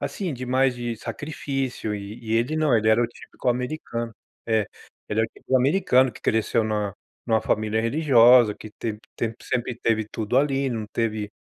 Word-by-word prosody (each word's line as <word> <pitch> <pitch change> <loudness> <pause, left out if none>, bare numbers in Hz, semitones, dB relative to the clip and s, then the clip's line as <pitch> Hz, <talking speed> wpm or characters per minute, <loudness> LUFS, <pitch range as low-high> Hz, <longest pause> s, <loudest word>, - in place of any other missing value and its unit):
assim, 185 -5 -3
de 130 -1 -6
mais 130 0 +2
de 120 -1 -4
sacrifício, 130 -1 -4
e 100 +3 -7
e 110 - -2
ele 120 +7 +1
não, 155 -5 +3
ele 110 0 +2
era 110 +2 +5
o 120 - +2
típico 120 - -7
americano 120 -2 -3 0.3
é. 110 -1 +3 0.5
Ele 105 +1 +1
era 115 - +2
o - - -17
típico 130 +3 -1
americano 130 -2 +3
que 105 - -14
cresceu 110 +1 +1
na 105 -3 -1 0.3
numa 110 -2 +3
família 110 +1 0
religiosa, 120 -4 +5
que 110 - -11
te 110 -2 -3 0.2
te 115 -1 -2
sempre 125 0 -2
teve 110 -3 +1
tudo 115 +3 0
ali, 135 -1 +1
não 110 -3 -3
teve 110 -2 -2
115 Hz, 185 wpm, -24 LUFS, 110-130 Hz, 0.5 s, era